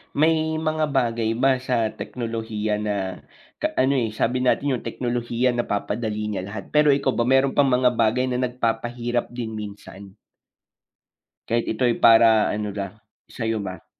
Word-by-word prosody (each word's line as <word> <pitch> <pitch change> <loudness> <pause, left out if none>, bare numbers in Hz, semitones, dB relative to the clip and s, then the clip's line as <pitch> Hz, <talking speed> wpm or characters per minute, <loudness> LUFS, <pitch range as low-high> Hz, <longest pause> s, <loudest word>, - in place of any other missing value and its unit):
may 160 +1 +2
mga 155 -1 0
bagay 115 -4 0
ba 135 +1 +3
sa 120 -4 0
teknolohiya 110 -1 -3
na 105 -1 -1 0.7
ka - - 0
ano, 130 +2 +3
eh, 115 -4 0
sabi 125 +3 0
natin 135 +2 +2
'yong 120 - -7
teknolohiya 120 +1 -1
napapadali 105 -1 -2
niya 95 -2 -3
lahat. 100 0 -7
Pero 150 0 +5
ikaw 135 -1 +1
ba 120 - +1
meron 130 +2 +3
bang 140 -1 +4
mga 125 0 +4
bagay 115 +3 +2
na 125 0 -1
nagpapahirap 120 0 -2
din 120 -2 -5
minsan? 100 -2 -9 1.3
Kahit 115 0 0
ito'y 120 +1 +1
para 115 -1 +6
ano 105 -1 -3
ba, 100 0 -5 0.3
sa'yo 110 -2 -2
ba? 95 -3 -7
115 Hz, 150 wpm, -23 LUFS, 110-130 Hz, 1.3 s, para